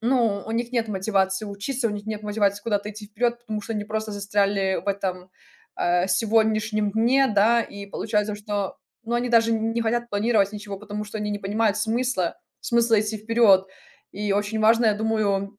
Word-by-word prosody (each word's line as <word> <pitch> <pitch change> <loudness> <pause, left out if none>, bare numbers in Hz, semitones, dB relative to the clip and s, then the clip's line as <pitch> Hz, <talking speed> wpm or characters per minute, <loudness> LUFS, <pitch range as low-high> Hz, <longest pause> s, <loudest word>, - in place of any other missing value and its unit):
ну, 230 -4 +1
у - - -6
них 235 +1 -1
нет 235 -2 +1
мотивации 195 0 0
учиться, 230 +5 -2
у - - -3
них 205 0 -6
нет 215 -1 -4
мотивации 205 -1 0
куда-то 210 -2 -1
идти 210 0 -10
вперед, 240 +3 -1
потому 215 -3 -4
что 225 - -5
они 210 -2 -2
просто 220 0 -3
застряли 200 -1 0
в - - -3
этом, 185 -2 -3 0.5
э, 175 +1 +2
сегодняшнем 215 +1 +1
дне, 250 +5 +3
да. 230 +3 +4
И 200 0 -9
получается, 210 +1 -1
что, 205 -1 -3 0.3
ну, 235 +1 -2
они 245 +1 0
даже 230 -1 +4
не 225 +1 0
хотят 240 +1 -1
планировать 205 -1 +2
ничего, 205 -2 -7
потому 210 0 -6
что 215 +1 -6
они 210 0 -2
не 205 - -2
понимают 210 +1 +1
смысла 230 -6 0 0.3
смысла 235 -2 +3
идти 215 +1 -3
вперед. 215 -3 +4 0.5
И 205 0 -2
очень 205 +2 -1
важно, 225 +2 +4
я 215 - +4
думаю, 205 -2 -1
210 Hz, 185 wpm, -24 LUFS, 200-225 Hz, 0.5 s, да